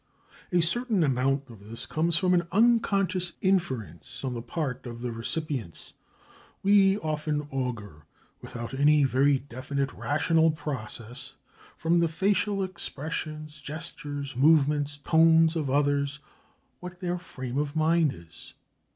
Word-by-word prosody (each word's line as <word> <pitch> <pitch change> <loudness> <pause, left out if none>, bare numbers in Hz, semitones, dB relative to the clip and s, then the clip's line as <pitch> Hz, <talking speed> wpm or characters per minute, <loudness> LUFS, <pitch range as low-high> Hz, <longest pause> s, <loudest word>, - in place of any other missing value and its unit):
A 175 -1 +3
certain 215 +2 +2
amount 135 0 +1
of 105 -2 -14
this 115 - -7
comes 165 +1 +1
from 180 +1 +2
an 175 -1 +2
unconscious 200 -4 +2
inference 125 - -1
on 130 - -2
the 120 - -4
part 125 +1 -4
of 120 0 -8
the 120 -1 -3
recipients. 115 - -4 0.7
We 195 0 +5
often 155 -4 -2
augur, 115 - -4 0.3
without 120 +1 -7
any 145 +2 +4
very 135 +1 +3
definite 135 +1 -4
rational 160 +2 +2
process, 125 -5 -6 0.4
from 170 +2 +2
the 170 - +3
facial 195 +4 +1
expressions, 155 -3 -5
gestures, 145 -2 -6
movements, 145 0 +3
tones 160 +1 +4
of 150 -4 -1
others, 140 0 +1 0.6
what 180 0 -9
their 180 -1 -2
frame 130 -6 -5
of 145 0 -2
mind 160 -1 +3
is. 85 -5 -12
150 Hz, 125 wpm, -27 LUFS, 130-170 Hz, 0.7 s, We